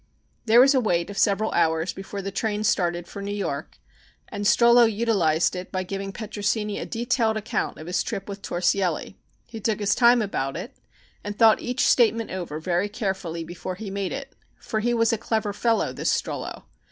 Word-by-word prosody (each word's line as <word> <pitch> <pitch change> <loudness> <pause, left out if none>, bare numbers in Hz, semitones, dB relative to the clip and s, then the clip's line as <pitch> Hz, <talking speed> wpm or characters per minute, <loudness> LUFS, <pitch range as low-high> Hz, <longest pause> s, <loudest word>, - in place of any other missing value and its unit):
There 225 +2 +7
was 270 +3 +7
a 265 - +4
wait 180 -5 0
of 200 - -9
several 210 +1 +2
hours 160 +1 +1
before 195 +1 -7
the 195 - -4
train 210 +1 -2
started 175 -6 0
for 200 - -8
New 200 - -5
York 145 -8 -4 0.5
and 205 - -5
Strollo 235 +3 +6
utilized 200 -8 +1
it 180 0 -6
by 185 -1 -2
giving 195 +1 -5
Petrosini 210 0 -2
a - - -5
detailed 230 -1 0
account 220 +2 -2
of 155 - -9
his 180 +1 0
trip 195 - -4
with 200 -1 -7
Torsielli. 180 -1 0 0.3
He 230 -2 -9
took 215 0 -1
his 205 -1 +2
time 240 -1 +5
about 135 -9 -3
it - - -7 0.5
and 205 0 -5
thought 225 -1 +5
each 250 0 0
statement 230 -2 +3
over 175 -5 -4
very 180 +4 0
carefully 190 -6 -3
before 175 +2 -6
he 200 +1 -7
made 195 -1 -3
it, 270 0 -6 0.3
for 220 - -3
he 240 +3 0
was 230 0 +2
a 225 - -1
clever 220 -2 -1
fellow, 230 +2 +1
this - - 0
Strollo. - - -3
205 Hz, 190 wpm, -24 LUFS, 185-225 Hz, 0.5 s, There